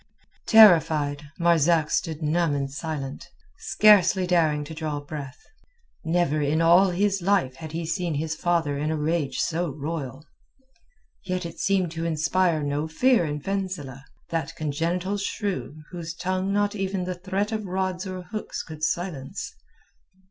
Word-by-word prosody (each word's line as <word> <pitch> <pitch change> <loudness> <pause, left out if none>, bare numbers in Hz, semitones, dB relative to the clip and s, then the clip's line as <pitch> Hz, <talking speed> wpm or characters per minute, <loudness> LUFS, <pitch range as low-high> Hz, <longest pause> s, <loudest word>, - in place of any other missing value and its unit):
Terrified, 155 -9 +5
Marzak 170 -2 +3
stood 160 -1 -1
numb 155 0 +1
and 140 -1 -2
silent, 145 -3 -5 0.3
scarcely 200 -3 +5
daring 160 -4 +2
to 145 - -8
draw 155 -2 -3
breath. 145 - -8 0.6
Never 160 -2 +1
in 150 +2 +1
all 175 +4 +6
his 195 +2 0
life 175 -9 +1
had 155 +2 -8
he 165 0 -3
seen 165 0 -2
his 155 +2 -2
father 160 -4 0
in 150 +1 -1
a 160 - -1
rage 150 -4 -1
so 170 +1 0
royal. 145 -1 -5 1.0
Yet 185 -1 -3
it 170 - -8
seemed 190 -4 +1
to 165 0 -4
inspire 165 0 +1
no 145 +2 -1
fear 235 +4 +3
in 150 -1 -3
Fenzileh, 185 -8 -4 0.3
that 165 0 -2
congenital 170 +6 -1
shrew 195 -6 -4
whose 170 -2 -6
tongue 185 +2 -1
not 205 0 +1
even 195 -2 -2
the 180 0 -3
threat 190 +4 -2
of 215 -2 -3
rods 185 0 -2
or 185 -1 -6
hooks 215 +3 -5
could 155 -1 -10
silence. 165 -5 -3
165 Hz, 150 wpm, -25 LUFS, 150-185 Hz, 1.0 s, all